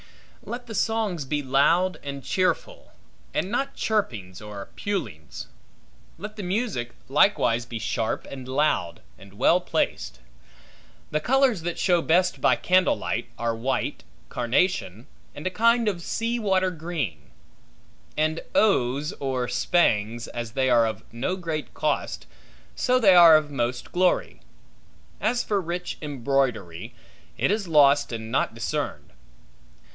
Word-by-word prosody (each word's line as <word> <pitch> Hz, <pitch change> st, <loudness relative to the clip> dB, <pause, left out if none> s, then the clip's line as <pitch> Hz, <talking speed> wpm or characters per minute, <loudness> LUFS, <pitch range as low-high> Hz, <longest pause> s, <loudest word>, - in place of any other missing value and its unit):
Let 245 Hz, +1 st, -6 dB
the 230 Hz, -, -8 dB
songs 215 Hz, -6 st, 0 dB
be 145 Hz, +1 st, -2 dB
loud 165 Hz, +8 st, +2 dB
and 140 Hz, -1 st, -6 dB
cheerful, 185 Hz, -, -1 dB, 0.4 s
and 190 Hz, -, -1 dB
not 275 Hz, +3 st, -1 dB
chirpings 110 Hz, -, -2 dB
or 105 Hz, -2 st, -8 dB
pulings. 185 Hz, -, -4 dB, 0.7 s
Let 210 Hz, +5 st, -8 dB
the 210 Hz, -, -6 dB
music 180 Hz, -, -2 dB
likewise 135 Hz, -, +3 dB
be 120 Hz, -, -5 dB
sharp 110 Hz, 0 st, -2 dB
and 130 Hz, -2 st, -9 dB
loud, 130 Hz, -, 0 dB, 0.2 s
and 100 Hz, 0 st, -15 dB
well 175 Hz, -, +4 dB
placed. -, -, -2 dB, 0.9 s
The 155 Hz, -, +1 dB
colors 255 Hz, -, +2 dB
that 175 Hz, +1 st, -3 dB
show 175 Hz, -2 st, +2 dB
best 180 Hz, +3 st, +2 dB
by -, -, +4 dB
candle 185 Hz, 0 st, +3 dB
light -, -, -3 dB
are 115 Hz, -1 st, -1 dB
white, 125 Hz, +3 st, -2 dB, 0.3 s
carnation, 120 Hz, -, 0 dB, 0.3 s
and 145 Hz, -, -8 dB
a 185 Hz, -, 0 dB
kind 230 Hz, +3 st, +3 dB
of 185 Hz, -5 st, -1 dB
sea 230 Hz, +6 st, -2 dB
water 190 Hz, -3 st, +1 dB
green; 150 Hz, -, -5 dB, 0.9 s
and 155 Hz, +1 st, +1 dB, 0.2 s
oes, 145 Hz, -, +2 dB
or 130 Hz, -2 st, -1 dB
spangs, 120 Hz, -4 st, +1 dB
as 120 Hz, -2 st, -6 dB
they 130 Hz, 0 st, +1 dB
are 115 Hz, -2 st, +5 dB
of 110 Hz, -3 st, -5 dB
no 130 Hz, +11 st, -2 dB
great 165 Hz, -5 st, -5 dB
cost, -, -, -2 dB, 0.5 s
so 255 Hz, -, +2 dB
they 210 Hz, -7 st, +6 dB
are 170 Hz, -3 st, +9 dB
of 150 Hz, -1 st, -3 dB
most 120 Hz, -2 st, -2 dB
glory. 180 Hz, 0 st, +1 dB, 0.8 s
As 240 Hz, +2 st, +1 dB
for 205 Hz, -2 st, 0 dB
rich 175 Hz, +1 st, -5 dB
embroidery, 130 Hz, -, -2 dB, 0.4 s
it -, -, +1 dB
is 210 Hz, -2 st, -1 dB
lost 145 Hz, -4 st, +4 dB
and 110 Hz, -1 st, -5 dB
not -, -, 0 dB
discerned. -, -, -4 dB
155 Hz, 135 wpm, -25 LUFS, 120-185 Hz, 0.9 s, are